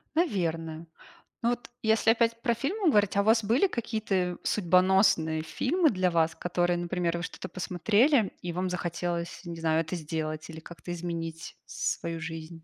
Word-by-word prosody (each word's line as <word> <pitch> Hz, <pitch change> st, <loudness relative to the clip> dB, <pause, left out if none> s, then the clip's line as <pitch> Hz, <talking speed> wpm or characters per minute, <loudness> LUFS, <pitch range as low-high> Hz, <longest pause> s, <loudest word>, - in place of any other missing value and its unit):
Наверно. 165 Hz, -, -1 dB, 0.5 s
Но 235 Hz, -, +2 dB
вот, 245 Hz, -1 st, -4 dB
если 220 Hz, 0 st, +4 dB
опять 230 Hz, 0 st, +1 dB
про 235 Hz, -, +2 dB
фильмы 325 Hz, -, 0 dB
говорить- 205 Hz, -6 st, +3 dB
а -, -, +5 dB
у -, -, -1 dB
вас 220 Hz, +1 st, +4 dB
были 235 Hz, -, +3 dB
какие-то 210 Hz, -, -1 dB
судьбоносные 180 Hz, -4 st, +3 dB
фильмы 315 Hz, -, +1 dB
для 185 Hz, -5 st, +1 dB
вас, 165 Hz, -1 st, +2 dB
которые, 175 Hz, 0 st, 0 dB
например, 175 Hz, 0 st, -1 dB
вы 170 Hz, -, -5 dB
что-то 185 Hz, -, -6 dB
посмотрели, 205 Hz, -, +2 dB
и 175 Hz, -, -4 dB
вам 180 Hz, +2 st, -1 dB
захотелось, 175 Hz, -1 st, -3 dB
не 170 Hz, -1 st, -6 dB
знаю, 160 Hz, 0 st, +2 dB
это 165 Hz, +2 st, -4 dB
сделать, 155 Hz, -1 st, -4 dB
или 160 Hz, 0 st, -8 dB
как-то 170 Hz, +2 st, -9 dB
изменить 165 Hz, -1 st, -5 dB
свою 165 Hz, 0 st, -3 dB
жизнь? 160 Hz, 0 st, -7 dB
180 Hz, 160 wpm, -28 LUFS, 165-220 Hz, 0.5 s, а